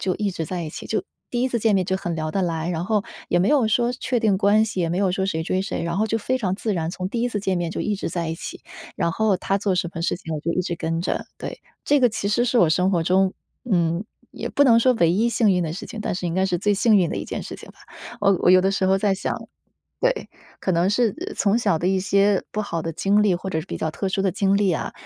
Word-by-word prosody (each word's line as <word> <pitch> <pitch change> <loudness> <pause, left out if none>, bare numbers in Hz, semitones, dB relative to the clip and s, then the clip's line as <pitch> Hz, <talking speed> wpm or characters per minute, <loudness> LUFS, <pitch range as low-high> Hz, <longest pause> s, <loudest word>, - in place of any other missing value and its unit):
就 185 - 0
一 205 -1 -1
直 170 -3 -4
在 180 +1 -3
一 155 - -5
起 - - -8
就 - - -1 0.3
第 240 0 -1
1 260 - +2
次 240 - -1
见 220 -2 +2
面 185 -1 +2
就 190 +1 0
很 175 -3 -3
聊 155 -1 -3
得 195 - -1
来， 165 -2 -1
然 165 -1 -2
后 210 0 +1 0.3
也 175 - +2
没 180 - +2
有 280 -6 +4
说 240 +2 +2
确 250 0 -1
定 210 -4 +2
关 205 +2 +4
系， 200 -4 -3
也 170 - +1
没 170 - -1
有 195 -1 +2
说 190 0 -1
谁 160 -4 -1
追 185 +3 -1
谁， 195 - -3
然 170 +2 -2
后 220 - +2
就 225 - 0
非 255 +4 -1
常 190 -6 -1
自 215 +1 -2
然， 165 -3 -1
从 185 0 -4
第 235 - -2
一 245 - +1
次 215 - -2
见 190 -2 0
面 170 -1 -2
就 - - -4
一 210 - 0
直 - - -3
在 170 -1 -3
一 160 - -2
起， - - -8 0.3
然 170 - 0
后 215 -2 +2
他 195 +2 -1
做 195 -2 0
什 175 -1 -1
么 165 - -5
事 170 - 0
情 165 -2 -7
我 155 - -3
就 170 +2 -1
一 180 - 0
直 175 - -3
跟 165 0 -2
着， - - -2
对。 - - -7 0.2
这 290 0 +3
个 250 - +5
其 215 -2 -4
实 240 +4 +2
是 245 0 +2
我 175 - +5
生 180 +3 +2
活 175 -4 +1
中 185 +3 +2 0.4
嗯， 170 0 +1 0.3
也 - - -5
不 285 - +2
能 235 -4 +6
说 255 +2 +4
唯 170 -7 +3
一 220 +5 +2
幸 230 -2 +3
运 180 -2 +2
的 155 - -3
事 185 - -6
情， 225 - -8
但 210 - -2
是 180 0 -3
应 170 - -2
该 190 0 +2
是 180 -2 0
最 205 +4 +1
幸 215 +1 +4
运 180 -4 +2
的 - - -3
一 - - -3
件 - - -5
事 - - -7
情 - - -13
吧。 - - -23 0.4
我 195 -1 +4
我 - - +5
有 185 0 +7
的 190 - +2
时 195 -1 0
候 190 - +4
在 200 -1 +2
想 195 - -3 0.7
对， - - 0 0.3
可 - - -1
能 170 +2 +2
是， 225 0 +2
呃， 410 - -6
从 205 +2 +2
小 230 - +2
的 175 +3 0
一 190 0 +2
些 200 +1 +2
不 215 - -1
好 170 -5 -3
的 165 - -3
经 200 +5 +2
历， 195 -4 +3
或 190 +2 -4
者 160 - -1
是 155 - -10
比 - - -5
较 160 - -2
特 195 +5 -3
殊 195 +1 -1
的 195 - +2
经 195 +1 +1
历 200 -2 +2
啊， 165 - -2
190 Hz, 325 characters per minute, -23 LUFS, 175-215 Hz, 0.7 s, 有